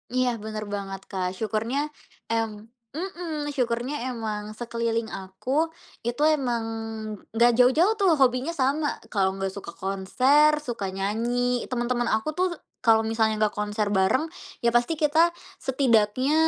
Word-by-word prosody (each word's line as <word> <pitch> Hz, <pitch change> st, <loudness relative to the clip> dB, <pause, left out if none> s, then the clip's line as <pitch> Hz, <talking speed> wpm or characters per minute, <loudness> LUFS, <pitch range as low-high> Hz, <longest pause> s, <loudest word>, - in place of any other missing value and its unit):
Iya 255 Hz, -1 st, +3 dB
bener 215 Hz, 0 st, -4 dB
banget 195 Hz, -1 st, -4 dB
Kak 185 Hz, -1 st, -2 dB
syukurnya, 220 Hz, +6 st, -1 dB, 0.5 s
em 225 Hz, -1 st, +1 dB, 0.4 s
mhm, 325 Hz, -4 st, -4 dB
syukurnya 245 Hz, +2 st, -1 dB
emang 215 Hz, -3 st, -4 dB
sekeliling 230 Hz, -1 st, -2 dB
aku, 190 Hz, +6 st, -6 dB, 0.6 s
itu 240 Hz, +5 st, -2 dB
emang 245 Hz, -5 st, -1 dB, 0.7 s
gak 240 Hz, +1 st, +6 dB
jauh-jauh 315 Hz, -, +5 dB
tuh 390 Hz, -2 st, +4 dB
hobinya 265 Hz, +4 st, +2 dB
sama 285 Hz, +2 st, +1 dB, 0.2 s
kalau 190 Hz, -2 st, +1 dB
gak 195 Hz, -1 st, -2 dB
suka 190 Hz, -3 st, -8 dB
konser, 255 Hz, +11 st, +3 dB
suka 235 Hz, -7 st, -3 dB
nyanyi 240 Hz, +5 st, 0 dB
temen-temen 240 Hz, -1 st, 0 dB
aku 220 Hz, +7 st, -2 dB
tuh 370 Hz, -, +4 dB, 0.3 s
kalau 225 Hz, -2 st, +4 dB
misalnya 220 Hz, 0 st, +1 dB
nggak 215 Hz, -1 st, +3 dB
konser 210 Hz, 0 st, -1 dB
bareng, 190 Hz, +9 st, +3 dB, 0.4 s
ya 235 Hz, -, +5 dB
pasti 240 Hz, +7 st, +2 dB
kita 305 Hz, +1 st, +2 dB, 0.4 s
setidaknya 255 Hz, 0 st, +2 dB
235 Hz, 130 wpm, -26 LUFS, 210-265 Hz, 0.7 s, gak